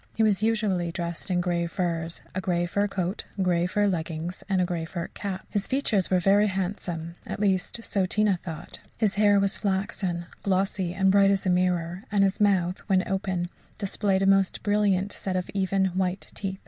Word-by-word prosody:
He 225 - +2
was 210 -2 +3
usually 210 -6 +1
dressed 170 +2 -4
in 180 -1 +2
grey 175 -1 0
furs 170 -1 -2
a 185 - -2
grey 175 -2 0
fur 200 +4 0
coat, 185 -1 -3
grey 175 -2 +2
fur 205 +3 +1
leggings, 170 -1 -3
and 190 -1 +2
a 180 - +3
grey 175 -2 -2
fur 170 +1 -5
cap. 195 -2 -5
His 205 -1 0
features 255 -8 +1
were 185 - +3
very 200 +4 +4
handsome 180 -4 -3
at - - -4
least, 200 +3 0
so 195 -4 0
Tina 205 -1 +2
thought 160 -4 -7 0.2
his 215 -3 +2
hair 205 0 +4
was 195 0 +1
flaxen, 190 -3 -1 0.2
glossy, 190 -2 0
and 190 0 +3
bright 200 0 +5
as 195 0 +1
a 185 - +3
mirror; 180 -1 0
and 200 -1 +4
his 195 +1 +1
mouth, 185 -3 +2
when 190 -2 +2
open, 190 -2 -1 0.3
displayed 195 -1 0
a - - +3
most 195 -1 +3
brilliant 205 -2 +2
set 190 -1 -4
of 180 -1 -2
even, 195 0 +1
white 185 0 -2
teeth. 190 -1 -4
190 Hz, 190 wpm, -26 LUFS, 175-200 Hz, 0.3 s, bright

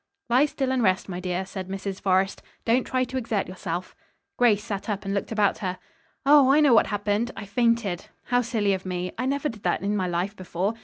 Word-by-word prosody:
"Lie 260 +5 +5
still 270 -3 -2
and 260 -1 +1
rest, 190 -3 +2
my 180 -1 -4
dear," 180 +1 -2
said 190 -1 -6
Mrs. 195 0 -5
Forrest, 190 0 +1 0.2
"Don't 240 +2 +3
try 255 0 0
to 255 +1 -4
exert 225 -5 -1
yourself." 180 -1 -5 0.4
Grace 215 -4 +3
sat 205 -1 -5
up 205 -1 -3
and 195 - -2
looked 200 - -2
about 210 -3 +2
her. 185 -2 -3 0.5
"Oh, 280 -2 +7
I 290 - +5
know 290 -5 +5
what 225 - +5
happened. 205 +3 0
I - - -6
fainted. 230 -4 0 0.2
How 245 0 +2
silly 220 -4 0
of 190 -1 -3
me. 180 -1 -3
I 255 - 0
never 280 +2 0
did 225 -7 -7
that - - 0
in 205 +1 0
my 185 -3 0
life 180 +4 -2
before. 185 +2 -2
205 Hz, 220 wpm, -25 LUFS, 190-240 Hz, 0.5 s, Oh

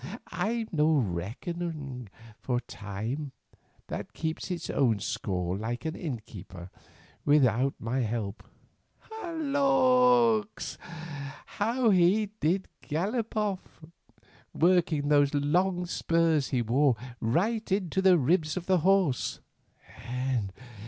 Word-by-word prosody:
I'm 220 +6 -1
no 155 -1 +3
reckoner 135 - -2 0.7
of 125 -1 0
time, 115 +9 -5 0.5
that - - -6
keeps 160 +3 -3
its 175 -2 -3
own 120 -6 +2
score 90 -3 -2
like 115 +5 -4
an 160 +1 -2
innkeeper, 105 - -7 0.5
without 135 -2 +3
my 115 +4 -2
help. 110 -3 -2 0.9
Lawks! 255 -7 +3 0.7
how 230 +2 +1
he 195 +3 +3
did 185 +5 +1
gallop 210 +9 -2
off, 205 -3 -2 0.8
working 165 -4 +3
those 145 -1 +4
long 180 +5 +1
spurs 165 -4 +1
he 125 -2 0
wore 130 +3 +3 0.2
right 200 - 0
into 190 -1 +1
the 190 -2 +6
ribs 155 +2 +1
of 180 - -4
the 185 -1 +3
horse. 185 -6 +2
160 Hz, 100 wpm, -29 LUFS, 125-195 Hz, 0.9 s, the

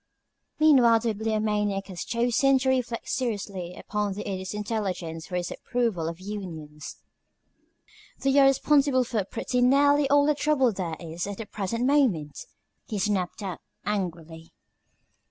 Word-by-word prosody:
Meanwhile 250 -7 +6
the 230 -1 0
Bibliomaniac 210 -2 -1
had 185 -3 -9
chosen 245 +5 +2
to 260 0 0
reflect 250 -3 -1
seriously 200 -7 -3
upon 210 -1 -2
the 205 - -6
Idiot's 190 0 -4
intelligence 190 -7 -3
for 180 - -5
his 175 -1 -2
approval 230 -10 -1
of 165 +1 -5
unions. 165 -7 -7 1.2
"They 270 +1 +3
are 275 - +7
responsible 275 -1 +3
for 230 -4 -1
pretty 245 +6 -2
nearly 285 +2 +4
all 285 0 +5
the 300 - +3
trouble 285 -4 +2
there 175 -4 -3
is 170 +2 -5
at 200 -1 -5
the 225 - -6
present 215 +4 -3
moment," 235 - +1 0.4
he 215 - -3
snapped 200 -1 -1
out, 185 -3 -5 0.2
angrily. 165 -5 -4
210 Hz, 140 wpm, -26 LUFS, 185-255 Hz, 1.2 s, are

